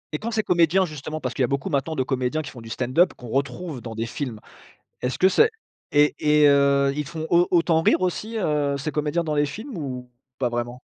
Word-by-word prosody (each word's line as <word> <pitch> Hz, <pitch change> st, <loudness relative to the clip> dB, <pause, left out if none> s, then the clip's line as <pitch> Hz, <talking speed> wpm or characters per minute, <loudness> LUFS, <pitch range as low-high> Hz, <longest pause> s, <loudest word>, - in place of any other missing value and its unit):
Et -, -, -3 dB
quand 230 Hz, -, -4 dB
ces 220 Hz, -1 st, 0 dB
comédiens, 175 Hz, +1 st, +3 dB
justement, 155 Hz, -1 st, -6 dB
parce 130 Hz, -4 st, -4 dB
qu'il -, -, -3 dB
y -, -, +5 dB
a -, -, +2 dB
beaucoup 140 Hz, +8 st, -2 dB
maintenant 145 Hz, +3 st, -1 dB
de 130 Hz, -, +1 dB
comédiens 130 Hz, +4 st, -1 dB
qui -, -, -8 dB
font 120 Hz, -, -11 dB
du 115 Hz, -, -10 dB
stand-up, 130 Hz, +10 st, +2 dB
qu'on 125 Hz, -, -11 dB
retrouve 135 Hz, +3 st, -3 dB
dans 115 Hz, 0 st, -7 dB
des 115 Hz, +1 st, -2 dB
films, 115 Hz, -2 st, -5 dB, 0.6 s
est-ce 125 Hz, +1 st, -2 dB
que 190 Hz, -, +5 dB
c'est 450 Hz, -, +4 dB, 0.4 s
et 145 Hz, 0 st, +4 dB
et 150 Hz, -1 st, +5 dB
heu, 140 Hz, -1 st, +4 dB
ils 150 Hz, 0 st, -2 dB
font 160 Hz, +2 st, -5 dB
au 175 Hz, +1 st, +4 dB
autant 165 Hz, -2 st, +3 dB
rire 165 Hz, -, +3 dB
aussi, 205 Hz, +5 st, -2 dB
heu, 150 Hz, -7 st, 0 dB
ces 150 Hz, +3 st, -4 dB
comédiens 150 Hz, +3 st, -1 dB
dans 155 Hz, -2 st, -2 dB
les 145 Hz, 0 st, +3 dB
films 220 Hz, -, -7 dB
ou 125 Hz, -5 st, -6 dB, 0.3 s
pas 125 Hz, -2 st, 0 dB
vraiment? 120 Hz, +1 st, -4 dB
145 Hz, 235 wpm, -24 LUFS, 130-165 Hz, 0.6 s, y